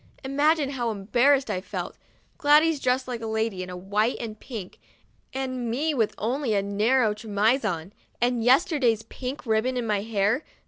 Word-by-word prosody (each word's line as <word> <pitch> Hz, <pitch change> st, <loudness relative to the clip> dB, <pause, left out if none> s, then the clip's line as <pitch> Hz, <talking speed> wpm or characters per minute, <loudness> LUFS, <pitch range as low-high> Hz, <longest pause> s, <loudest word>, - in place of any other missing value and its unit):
Imagine 290 Hz, +2 st, +2 dB
how 245 Hz, -4 st, -2 dB
embarrassed 240 Hz, +7 st, +2 dB
I 185 Hz, -, -2 dB
felt, -, -, -5 dB, 0.4 s
Gladys 305 Hz, 0 st, +4 dB
dressed 255 Hz, 0 st, 0 dB
like 245 Hz, -2 st, -4 dB
a 225 Hz, -, -4 dB
lady, 220 Hz, -3 st, -1 dB
in 180 Hz, -, -6 dB, 0.2 s
white 215 Hz, +4 st, +2 dB
and 220 Hz, -2 st, -6 dB
pink, 220 Hz, -8 st, -8 dB, 0.5 s
and 255 Hz, -2 st, -3 dB
me 295 Hz, +7 st, 0 dB
with 225 Hz, -6 st, 0 dB
only 240 Hz, +1 st, -1 dB
a 200 Hz, -, +1 dB
narrow 215 Hz, +3 st, +2 dB
chemise 215 Hz, +4 st, +1 dB
on, 180 Hz, -2 st, -3 dB, 0.3 s
and 240 Hz, -1 st, +1 dB
yesterday's 255 Hz, -, +3 dB
pink 260 Hz, +1 st, -7 dB
ribbon 230 Hz, +3 st, +1 dB
in 245 Hz, -, -1 dB
my 210 Hz, -2 st, 0 dB
hair. 215 Hz, +5 st, 0 dB
235 Hz, 165 wpm, -26 LUFS, 215-265 Hz, 0.5 s, Gladys